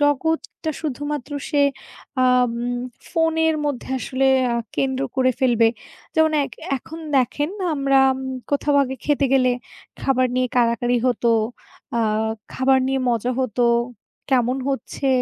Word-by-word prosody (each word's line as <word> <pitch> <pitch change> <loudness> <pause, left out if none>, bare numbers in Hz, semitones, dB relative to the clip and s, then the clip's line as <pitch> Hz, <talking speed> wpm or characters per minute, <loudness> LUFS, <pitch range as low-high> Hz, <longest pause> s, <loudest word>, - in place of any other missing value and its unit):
জগৎটা 315 +2 0
শুধুমাত্র 290 -1 -4 0.2
সে 290 -2 +2 0.6
আ - - +5 0.2
উম 240 +1 -3 0.3
ফোনের 320 -1 +2
মধ্যে 285 -4 -3
আসলে 265 +1 0 0.3
আ - - +1 0.2
কেন্দ্র 265 0 0
করে 255 -1 +4
ফেলবে। 235 -3 +4 0.5
যেমন 315 -1 +4
এক - - -8 0.2
এখন 320 +5 -9 0.2
দেখেন, 290 +4 +1 0.2
আমরা 275 -1 +3 0.2
উম 265 - -6 0.3
কোথাও 285 0 +1
আগে 265 0 -3
খেতে 290 -2 +2
গেলে, 255 -2 +4 0.5
খাবার 255 -1 +2
নিয়ে 255 0 +1
কাড়াকাড়ি 240 +1 +2
হতো, 240 -1 +2 0.7
আ - - +2 0.5
খাবার 265 0 +3
নিয়ে 270 0 0
মজা 240 +1 0
হতো, 245 -1 0 0.7
কেমন 250 0 +2
হচ্ছে, 275 0 -2
265 Hz, 130 wpm, -22 LUFS, 250-290 Hz, 0.7 s, আ